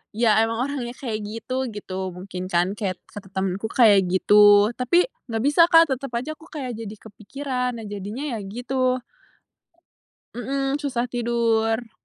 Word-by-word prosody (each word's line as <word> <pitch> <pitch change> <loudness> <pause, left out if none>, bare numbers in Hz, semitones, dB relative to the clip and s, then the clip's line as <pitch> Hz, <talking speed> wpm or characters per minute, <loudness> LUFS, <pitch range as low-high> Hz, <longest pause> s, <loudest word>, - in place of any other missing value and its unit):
ya 225 -2 +3
emang 225 +1 -2
orangnya 250 -4 -4
kayak 230 -5 -4
gitu 255 +5 -4
gitu, 190 -2 -5
mungkin 185 0 -7
kan 175 +1 +1
kayak 185 -4 -3
kata 205 -2 -10
temenku 190 +2 -2
kayak 210 -5 +5
gitu, 205 +2 +6
tapi 345 +9 +3 0.2
nggak 225 -1 -2
bisa 295 +4 +5
Kak, 330 -3 +6
tetep 265 0 -3
aja 280 +7 -3
aku 320 - -16
kayak 255 -7 -5
jadi 220 -1 -7
kepikiran, 250 +4 -4
nah - - -8
jadinya 205 +6 -6
ya - - -6
gitu. 255 +4 -1 1.3
Mhm, 270 +3 -2
susah 250 -5 -2
tidur. 230 -1 0
230 Hz, 150 wpm, -23 LUFS, 205-260 Hz, 1.3 s, gitu